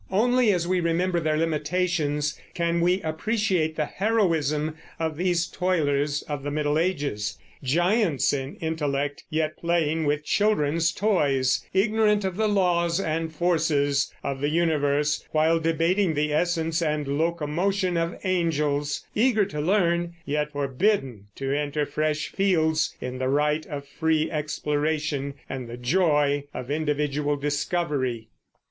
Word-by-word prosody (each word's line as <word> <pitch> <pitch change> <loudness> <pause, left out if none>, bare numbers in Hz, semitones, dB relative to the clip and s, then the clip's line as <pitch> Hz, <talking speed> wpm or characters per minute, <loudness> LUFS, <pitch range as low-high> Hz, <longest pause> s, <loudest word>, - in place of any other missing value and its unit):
Only 240 +3 +3
as 175 -3 0
we 185 0 +1
remember 175 +1 +1
their 155 -1 0
limitations 155 -1 0 0.2
can 170 -1 0
we 180 +2 +2
appreciate 170 -1 0
the 155 - 0
heroism 160 -8 0 0.2
of 160 -1 -1
these 175 0 +1
toilers 150 -5 0
of 145 -2 -5
the 145 - -4
Middle 150 +1 0
Ages, 140 - -1 0.3
giants 175 - +2
in 135 0 -3
intellect, 145 -3 -2
yet 155 0 -1
playing 165 -2 0
with 150 +1 0
children's 170 -6 +2
toys; 145 -12 +1
ignorant 210 +1 +2
of 190 -2 -2
the 215 +1 +1
laws 175 -3 +2
and 160 -2 -2
forces 150 -4 +1
of 135 -1 -3
the 145 - +1
universe, 150 -2 +1
while 160 +1 +3
debating 165 +2 +1
the 150 0 0
essence 165 0 0
and 150 -3 -1
locomotion 170 +4 0
of 165 0 -1
angels; 150 -5 0
eager 220 -2 +3
to 150 -6 -4
learn, 170 -1 +1
yet 150 +1 -1
forbidden 135 - 0
to 135 0 -2
enter 150 0 -1
fresh 155 +1 -1
fields 160 -5 +1
in 125 0 -5
the 130 0 0
right 150 +2 +1
of 140 -1 -6
free 160 +2 0
exploration 150 -2 -1
and 130 -3 -6
the 120 - -7
joy 145 +1 +2
of 130 +2 -5
individual 150 -1 0
discovery. 145 -5 -2
155 Hz, 135 wpm, -25 LUFS, 145-175 Hz, 0.3 s, Only